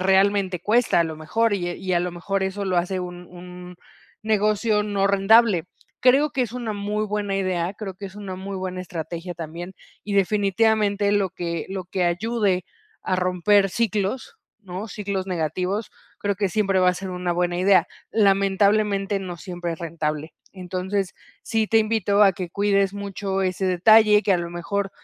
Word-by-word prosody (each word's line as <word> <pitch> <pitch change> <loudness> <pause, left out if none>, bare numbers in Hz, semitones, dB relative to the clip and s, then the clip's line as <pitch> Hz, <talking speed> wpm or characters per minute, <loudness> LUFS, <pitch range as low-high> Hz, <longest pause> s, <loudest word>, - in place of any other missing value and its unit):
realmente 190 -1 +2
cuesta, 225 -1 +3
a 170 - +3
lo 160 -1 -5
mejor. 210 +8 0
Y 175 -2 -2
y 185 +1 -4
a 175 - +3
lo 180 0 -2
mejor, 190 +3 -2
eso 190 +1 -2
lo 185 -2 0
hace, 185 +2 0
un 180 0 -7
un 180 0 -11 0.5
negocio, 215 0 +2
no 200 -1 0
rentable. 200 -2 +4 0.4
Creo 275 +4 +4
que 260 - 0
es 235 - -4
una 240 -3 -3
muy 210 +1 -2
buena 205 -1 -2
idea. 185 -1 -1
Creo 195 -3 -6
que 195 +2 -8
es 190 - -12
una 200 -3 -7
muy 195 +1 -6
buena 185 -1 -4
estrategia, 175 0 -6
también. 170 +3 -7 0.3
Y 205 - -4
definitivamente, 205 +1 +2
lo 200 -3 +1
que 170 -2 -4
lo 190 -1 -5
que 180 0 -1
ayude, 190 0 0 0.4
a 185 - 0
romper 185 +2 +2
ciclos, 225 - -2 0.2
¿no? 190 +2 -6
Ciclos 200 -3 -3
negativos. 180 +4 -2 0.3
Creo 200 0 -1
que 200 -2 0
siempre 195 -1 +1
va 185 - +4
a - - -4
ser 190 +1 -6
una 180 -1 -2
buena 175 0 0
idea. 190 +1 +4 0.2
Lamentablemente, 200 0 +2
no 180 -2 -6
siempre 175 -2 -5
es 165 - -8
rentable. 155 -2 -4 0.2
Entonces, 185 +1 -3 0.3
sí 225 -2 0
te 225 - +4
invito, 215 -2 +2
a 195 - +6
que 180 -1 -5
cuides 200 0 +1
mucho 200 -1 -3
ese 185 +1 -1
detalle, 210 +3 +5
que 200 - +2
a 180 - +2
lo 170 0 -4
mejor, 195 +3 -3
195 Hz, 175 wpm, -23 LUFS, 180-205 Hz, 0.5 s, a